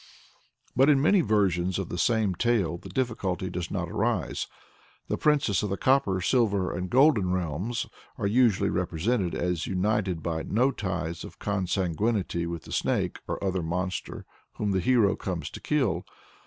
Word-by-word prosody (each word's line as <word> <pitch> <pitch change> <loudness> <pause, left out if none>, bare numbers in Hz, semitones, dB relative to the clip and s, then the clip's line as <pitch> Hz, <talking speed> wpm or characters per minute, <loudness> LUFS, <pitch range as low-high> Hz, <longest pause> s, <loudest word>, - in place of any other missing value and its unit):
But 135 +4 +5
in 145 -2 +5
many 180 +7 +4
versions 95 - +1
of 95 -3 -3
the - - -4
same 110 -3 +2
tale 95 -5 +1
the - - -11
difficulty 100 -8 -2
does 90 -1 -4
not 90 -3 -2
arise. 110 -4 -1 0.6
The - - +1
princesses 140 - +2
of 105 - -2
the 100 - -2
copper, 130 -8 +2
silver, 100 -4 +1
and 90 +1 -3
golden 125 -9 +4
realms, 90 +6 -2 0.3
are - - -2
usually 105 -2 +3
represented 90 +3 0
as 90 -2 -1
united 95 -3 0
by 80 -1 -2
no 125 +10 +2
ties 85 -7 -3
of - - -10
consanguinity 95 -1 -1
with 85 -1 -5
the - - -12
snake - - 0
or - - -3
other 95 -2 0
monster 90 +3 -3 0.3
whom 105 -1 -1
the 95 - +2
hero 105 0 +3
comes 85 -5 -4
to - - -8
kill. 115 - 0
95 Hz, 160 wpm, -27 LUFS, 90-115 Hz, 0.6 s, But